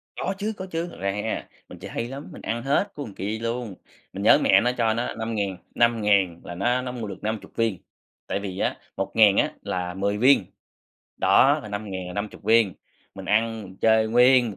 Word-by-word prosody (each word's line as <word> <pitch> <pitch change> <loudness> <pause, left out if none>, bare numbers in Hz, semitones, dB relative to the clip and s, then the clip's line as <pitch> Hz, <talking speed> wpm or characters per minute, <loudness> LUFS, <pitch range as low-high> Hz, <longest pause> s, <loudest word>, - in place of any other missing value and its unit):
Có 190 - -2
chứ 215 +2 -2
có 185 - -5
chứ, 165 +1 -2
thật - - -12
ra 100 0 0
ha, 105 +3 -3 0.2
mình - - -11
chơi - - -8
hay 115 - -3
lắm, 135 +3 -8
mình - - -10
ăn 115 +1 -3
hết 145 +10 +1
của 145 -4 -5
kia 105 +4 -3
luôn, 115 -3 -3 0.4
mình - - -5
nhớ - - +7
mẹ - - +5
nó 125 - +2
cho 115 -2 +2
nó 120 +2 -2
5000, 110 -4 -3 0.2
5000 105 -7 +2
là 85 - -7
nó 120 +7 +1
nó 125 - -4
mua 120 -3 -5
được 100 - -7
50 110 0 -4
viên, 115 -4 0 0.5
tại - - -1
vì 95 -2 -6
á, - - 0 0.2
1000 105 -3 +4
á - - +3
là 90 -1 -3
10 100 +2 -1
viên, 130 +5 +5 0.7
đó, - - +4
là 105 - -8
5000 100 -3 -5
là 90 - -7
50 100 +1 -5
viên, 110 -3 +4 0.4
mình 95 - -8
ăn 110 +3 +1
mình 95 0 -12
chơi 110 0 +4
nguyên 125 +1 +5
một 100 - -9
110 Hz, 215 wpm, -25 LUFS, 100-120 Hz, 0.7 s, nhớ